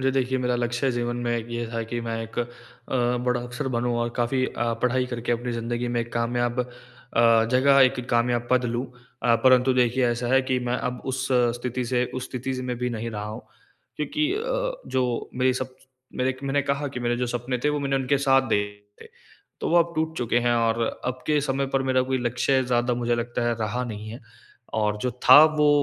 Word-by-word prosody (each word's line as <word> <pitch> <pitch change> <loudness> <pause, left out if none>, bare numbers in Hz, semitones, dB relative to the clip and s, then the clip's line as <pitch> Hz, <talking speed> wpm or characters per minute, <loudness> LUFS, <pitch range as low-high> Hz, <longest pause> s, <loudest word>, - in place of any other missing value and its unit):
जी 135 0 +2
देखिए, 130 -1 0
मेरा 125 -1 0
लक्ष्य 120 +2 0
जीवन 120 0 -2
में 120 0 0
एक 115 - -4
ये 120 0 -3
था 115 - -2
कि 120 - -2
मैं 115 -1 -3
एक 115 - -8
अ, 120 - 0 0.8
बड़ा 125 -1 +1
अफ़सर 120 +2 -4
बनूँ 120 0 0
और 120 - 0
काफ़ी 125 +2 +1
अ, 120 -1 -2
पढ़ाई 125 +1 +2
करके 120 -1 -2
अपनी 120 +1 -2
ज़िंदगी 120 +1 -2
में 120 0 0
एक 115 0 -6
कामयाब 120 +1 0
अ, 125 - -4 0.8
जगह 135 +2 +5
एक 130 0 +1
कामयाब 120 0 +1
पद 125 0 +3
लूँ। 120 +2 -2 0.4
अ, 120 -1 +4
परंतु 130 0 +5
देखिए 125 0 +2
ऐसा 120 +1 -1
है 130 +1 +5
कि 130 -1 0
मैं 125 - +1
अब 125 -1 -3
उस 130 +1 -3
अ, 125 -1 +4
स्थिति 125 +1 -3
से 125 +1 +1
उस 130 -1 -3
स्थिति 130 +1 -4
में 125 -1 -3
भी 125 0 -1
नहीं 115 0 -4
रहा 105 -1 -5
हूँ 105 +1 -7 0.5
क्योंकि 305 - -1
अ, - - -1
जो 125 -2 -1
मेरे 130 0 +2
सब 130 0 -5 0.4
मेरे 130 +1 +2
क 130 +1 -15
मैंने 140 +1 +1
कहा 140 +1 -1
कि 125 - -4
मेरे 120 0 0
जो 125 - -1
सपने 120 +1 -2
थे 150 - +4
वो 150 - -1
मैंने 135 -1 0
उनके 135 +1 +1
साथ 135 -2 +3
देखे 105 -1 -3
थे - - -14 0.5
तो - - -1
वो 170 - +3
अब 170 0 +2
टूट 160 +1 -1
चुके 120 -1 +1
हैं 120 - +4
और 115 0 +1 0.2
अब 125 0 -3
के 150 -1 +3
समय 135 -1 -1
पर 135 - +3
मेरा 130 -1 +2
कोई 130 0 -1
लक्ष्य 125 +2 +1
ज़्यादा 120 0 +1
मुझे 120 0 0
लगता 120 +1 -2
है 120 - +1
रहा 115 +4 -1
नहीं 110 -2 -6
है। 115 - -8 0.5
और 105 -1 +1
जो 125 - 0
था 150 - +10
वो 155 -1 +3
125 Hz, 225 wpm, -25 LUFS, 120-130 Hz, 0.8 s, था